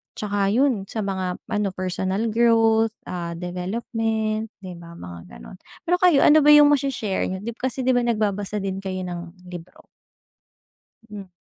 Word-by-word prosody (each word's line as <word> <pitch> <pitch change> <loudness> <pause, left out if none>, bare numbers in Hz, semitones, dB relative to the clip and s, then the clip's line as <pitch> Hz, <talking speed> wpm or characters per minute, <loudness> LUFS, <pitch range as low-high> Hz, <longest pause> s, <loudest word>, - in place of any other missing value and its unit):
Tsaka 205 -1 -1
yun, 230 -1 +1
sa 220 - -4
mga 190 -2 -3
ano, 210 -1 0
personal 185 +4 -2
growth, 225 -1 +3
ah, 170 -1 -5
development, 215 +5 -2 0.2
'di 180 -2 -8
ba, 170 0 -12
mga 85 - -10
gano'n. - - -12 0.3
Pero 355 +1 +1
kayo, 350 -6 +5
ano 310 +1 +7
ba 295 0 +6
yung 295 0 +7
mashe-share 265 -8 0
niyo, 190 +1 -5
di 235 - -3
kasi 260 +2 -4
'di 255 - +3
ba 245 - +3
nagbabasa 210 -3 -1
din 195 -1 -3
kayo 190 -1 -4
ng 175 0 -8
libro? 175 0 -11 1.3
Mm. 200 -2 -8
205 Hz, 160 wpm, -23 LUFS, 185-230 Hz, 1.3 s, ano